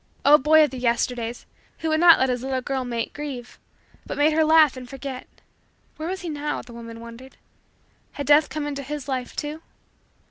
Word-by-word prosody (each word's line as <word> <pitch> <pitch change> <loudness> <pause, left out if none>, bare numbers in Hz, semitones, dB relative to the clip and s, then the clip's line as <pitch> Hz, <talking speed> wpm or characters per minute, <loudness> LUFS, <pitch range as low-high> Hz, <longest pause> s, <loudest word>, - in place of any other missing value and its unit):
Oh, 295 +2 +8
boy 310 +3 +5
of 300 - 0
the 260 - -6
Yesterdays, 240 0 -1 0.3
who 320 - -3
would 315 0 +2
not 340 -1 +8
let 260 - +1
his 250 -1 -1
little 260 0 -2
girl 265 0 -2
mate 235 -2 -4
grieve 275 -5 -7 0.4
but - - -6
made 300 +2 +3
her 320 +1 +3
laugh 310 -3 +5
and 250 -1 -9
forget! 270 -1 -7 0.7
Where 315 +2 -4
was 380 +1 -4
he 350 - -5
now? 295 -1 -3
The 245 - -13
woman 230 -1 -9
wondered. 235 +3 -12 0.8
Had 285 - -5
Death 295 +1 +5
come 305 -1 -4
into 285 -1 -4
his 285 0 -6
life, 255 -2 -4
too? 300 +1 -5
275 Hz, 200 wpm, -24 LUFS, 250-300 Hz, 0.8 s, Oh